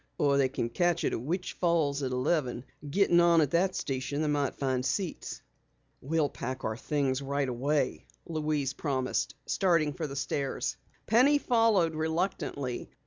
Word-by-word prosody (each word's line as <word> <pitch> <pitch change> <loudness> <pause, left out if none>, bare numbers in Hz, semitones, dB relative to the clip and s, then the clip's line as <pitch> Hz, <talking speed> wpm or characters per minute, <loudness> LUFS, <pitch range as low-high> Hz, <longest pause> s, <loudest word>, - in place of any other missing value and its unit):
"Or 140 -1 +3
they 135 -1 +3
can 120 -3 -2
catch 175 +7 +1
it - - 0
at - - -2
Witch 175 +8 -3
Falls 160 -5 +1
at 130 -2 -2
eleven. 125 -1 0 0.3
Getting 175 +1 +4
on 170 -1 +5
at 150 -3 +2
that 185 +2 +2
station 135 +3 -2
they - - 0
might 145 -2 0
find 130 -2 -1
seats." 175 +7 -3 0.6
"We'll 155 +2 +1
pack 130 0 -5
our 110 - -1
things 135 +1 -1
right 140 0 -1
away," 140 +4 -1 0.2
Louise 150 -4 -1
promised, 130 -4 -1
starting 165 -6 +2
for 155 +2 -4
the 140 - -7
stairs. 140 0 -2 0.3
Penny 255 +7 +5
followed 225 - +3
reluctantly. 160 -5 -2
145 Hz, 155 wpm, -29 LUFS, 135-170 Hz, 0.6 s, on